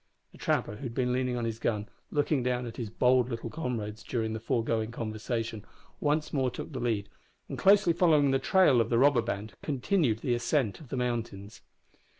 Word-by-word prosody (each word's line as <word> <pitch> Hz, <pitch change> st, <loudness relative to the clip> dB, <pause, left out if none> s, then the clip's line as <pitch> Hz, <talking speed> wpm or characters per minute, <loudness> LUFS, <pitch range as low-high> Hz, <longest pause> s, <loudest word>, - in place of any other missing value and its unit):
The -, -, -17 dB
trapper, 105 Hz, -, 0 dB
who -, -, -13 dB
had 120 Hz, -4 st, -5 dB
been 125 Hz, -1 st, +1 dB
leaning 125 Hz, -1 st, 0 dB
on 120 Hz, -, -2 dB
his 115 Hz, -1 st, -3 dB
gun, 105 Hz, -3 st, -1 dB, 0.2 s
looking 145 Hz, -1 st, +1 dB
down 125 Hz, 0 st, -1 dB
at 115 Hz, -, -8 dB
his 115 Hz, -4 st, -4 dB
bold 125 Hz, +2 st, +3 dB
little 115 Hz, -1 st, -5 dB
comrades 110 Hz, -8 st, -4 dB
during 110 Hz, -3 st, -2 dB
the 110 Hz, -, -3 dB
foregoing 115 Hz, -1 st, -1 dB
conversation, 115 Hz, -1 st, -4 dB, 0.4 s
once 150 Hz, +1 st, 0 dB
more 135 Hz, -3 st, +1 dB
took 125 Hz, -, -7 dB
the 130 Hz, -, -3 dB
lead, 110 Hz, -4 st, -1 dB, 0.4 s
and, -, -, -5 dB
closely 200 Hz, -3 st, +5 dB
following 155 Hz, -5 st, +4 dB
the 135 Hz, -, +2 dB
trail 180 Hz, -, +4 dB
of 115 Hz, -, -1 dB
the 115 Hz, -, +2 dB
robber 135 Hz, -1 st, +5 dB
band, 105 Hz, -1 st, -4 dB
continued 145 Hz, -, +1 dB
the 125 Hz, -, 0 dB
ascent 120 Hz, -2 st, 0 dB
of 150 Hz, -6 st, -13 dB
the 135 Hz, -, -3 dB
mountains. 115 Hz, -4 st, -3 dB
120 Hz, 195 wpm, -29 LUFS, 110-135 Hz, 0.4 s, closely